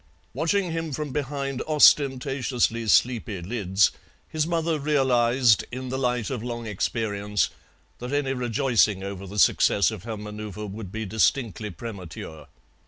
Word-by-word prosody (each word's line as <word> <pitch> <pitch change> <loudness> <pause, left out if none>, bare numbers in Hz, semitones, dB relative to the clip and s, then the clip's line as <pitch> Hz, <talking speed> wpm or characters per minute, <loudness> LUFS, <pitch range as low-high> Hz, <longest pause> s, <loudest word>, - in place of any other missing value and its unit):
Watching 180 +2 0
him 165 -2 -3
from 150 0 -4
behind 140 -1 -3
ostentatiously 135 -5 +3
sleepy 115 -3 +2
lids, 95 0 +1 0.4
his 155 0 -1
mother 165 -2 0
realized, 130 -5 +3
in 130 +1 -5
the 130 +1 -2
light 125 -3 -1
of 125 -4 -3
long 120 -1 -5
experience, 105 -1 -1 0.5
that 125 +2 -6
any 145 -2 0
rejoicing 120 -5 +1
over 100 0 -6
the 100 +3 -8
success 100 +1 +4
of 110 -4 -7
her 110 +1 -5
manoeuvre 105 0 -7
would 100 -1 -7
be 110 +1 -4
distinctly 110 0 0
premature. 85 -7 -8
120 Hz, 135 wpm, -25 LUFS, 105-135 Hz, 0.5 s, success